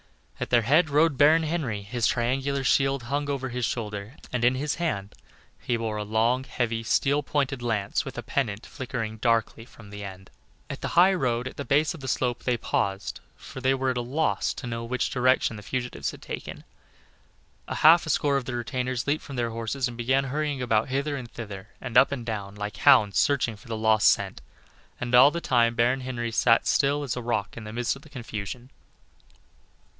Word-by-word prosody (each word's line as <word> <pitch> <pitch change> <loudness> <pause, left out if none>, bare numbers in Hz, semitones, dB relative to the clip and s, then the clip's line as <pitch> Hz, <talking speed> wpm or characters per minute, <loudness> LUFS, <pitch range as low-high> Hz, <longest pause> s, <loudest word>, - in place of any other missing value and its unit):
At - - -3
their 120 -2 +4
head 155 +7 +4
rode 150 -1 +3
Baron 155 +3 +6
Henry; 145 -11 -2
his 115 +2 0
triangular 135 +3 0
shield 135 -1 +2
hung 145 +4 -2
over 135 -2 -2
his 125 0 -4
shoulder, 105 +1 -4 0.2
and 125 -2 -1
in 125 +2 +4
his 145 +3 -1
hand 100 - -2 0.5
he 120 - -1
bore 110 -2 -3
a 105 - -2
long, 115 +4 +1
heavy, 115 -3 -2
steel 140 +5 +1
pointed 140 -3 -1
lance 110 -4 -1
with 135 - -8
a 120 - -4
pennant 110 -4 -2
flickering 120 -5 -5
darkly 115 0 0
from 110 -3 -15
the 105 0 -7
end. 95 -1 -9 0.4
At - - -7
the - - -2
high 185 +3 +7
road 125 -7 0
at - - -9
the 140 - -3
base 150 +3 +2
of 165 - -10
the 135 - -7
slope 125 -2 -1
they 125 -1 +1
paused, 100 -2 -2 0.2
for 130 - -10
they 135 +1 +3
were 130 0 0
at 125 - -4
a - - 0
loss 125 -4 -1
to - - -7
know 115 -1 -4
which 125 +2 -2
direction 130 -2 +2
the 105 - -8
fugitives 125 +3 -3
had - - -10
taken; - - -7 1.0
a - - -4
half 165 +2 +6
a - - -3
score 145 -1 +2
of 135 - -3
the 125 - -4
retainers 125 0 -2
leaped 145 +2 0
from 140 - -8
their 120 -2 -1
horses, 115 +3 -2
and 120 - -7
began 130 +3 +1
hurrying 145 0 -2
about 110 -2 +1
hither 140 +2 -1
and 125 -4 -7
thither, 105 -4 -8
and 125 -3 -7
up - - +6
and 125 -4 -4
down, 100 -3 -5
like 105 +1 -5
hounds 105 -2 +5
searching 125 -6 +1
for 105 - -17
the 115 -1 -3
lost 110 -1 +4
scent, - - 0 0.6
and 125 0 -4
all 125 +3 +9
the 170 - -3
time 120 -6 +2
Baron 125 +3 +2
Henry 120 -2 -3
sat 115 0 +3
still 145 +1 +2
as 135 - -3
a 125 - -4
rock 115 -3 -2
in 110 - -8
the 105 - -7
midst 120 +3 -1
of 135 - -13
the 155 - -16
confusion. 120 -1 -7
125 Hz, 210 wpm, -26 LUFS, 115-135 Hz, 1.0 s, all